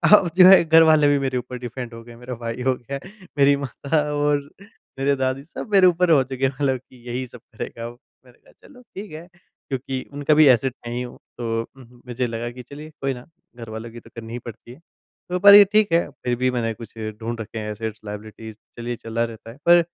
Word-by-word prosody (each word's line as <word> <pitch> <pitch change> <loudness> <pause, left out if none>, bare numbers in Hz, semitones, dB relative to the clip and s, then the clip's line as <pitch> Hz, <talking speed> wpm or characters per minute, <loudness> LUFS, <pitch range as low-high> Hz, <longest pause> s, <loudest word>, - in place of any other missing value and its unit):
अब 185 -4 +2
जो 185 - +9
है 190 -2 +8
घर 165 +1 +7
वाले 155 -2 +5
भी 145 0 +4
मेरे 130 -2 -1
ऊपर 125 +1 -5
डिपेंड 120 0 -7
हो 115 - -9
गए 120 0 -13
मेरा 125 +2 -8
भाई 115 +2 -4
हो 130 0 +3
गया, 135 +3 -7 0.4
मेरी 140 0 +5
माता 140 +2 -1
और 145 0 +2 0.6
मेरे 140 +1 +2
दादी 130 0 -2
सब 170 +7 -9
मेरे 190 -2 +7
ऊपर 180 0 +3
हो 140 -4 +5
चुके 130 0 -2
हैं। 135 - +1
मतलब 135 -1 0
कि 130 0 -21
यही 125 +2 -3
सब 125 - -13
करेगा, 115 +1 -6
अब 120 +1 -8 0.3
मैंने 125 -1 -20
कहा - - -23 0.2
चलो 250 -3 -16
ठीक 200 -1 -7
है। 160 +3 -9 0.4
क्योंकि 135 -1 -3
उनका 145 +2 +1
भी 155 +1 +6
एसेट 130 +2 -3
मैं 120 - -4
ही 125 - -2
हूँ। 125 -1 -8 0.2
तो 115 -1 -2 0.2
हुँ 130 - -13
हुँ 120 0 -21
मुझे 125 0 -2
लगा 115 +1 -4
कि 125 +1 -10
चलिए 150 +4 -10
कोई 135 -1 0
ना 125 -1 -11 0.3
घरवालों 115 0 -8
की 120 - -10
तो 115 - -18
करनी 115 0 -8
ही 120 - -4
पड़ती 115 +2 -13
है। 135 - -17 0.5
तो 180 0 -1
पर 200 +1 +9
ये 205 0 +10
ठीक 215 -3 +4
है 170 - +2 0.2
फिर 125 -1 +1
भी 130 0 +1
मैंने 115 -2 -1
कुछ 115 0 -12 0.3
ढूँढ 115 0 -4
रखे 110 +1 -7
हैं 105 0 -4
एसेट्स 110 0 -5
लायबिलिटीज़ 110 +1 -8 0.2
चलिए 120 +1 -4
चला 115 0 -3
रहता 115 0 -7
है। 120 - -15
पर 175 0 +7
125 Hz, 240 wpm, -22 LUFS, 115-145 Hz, 0.6 s, ये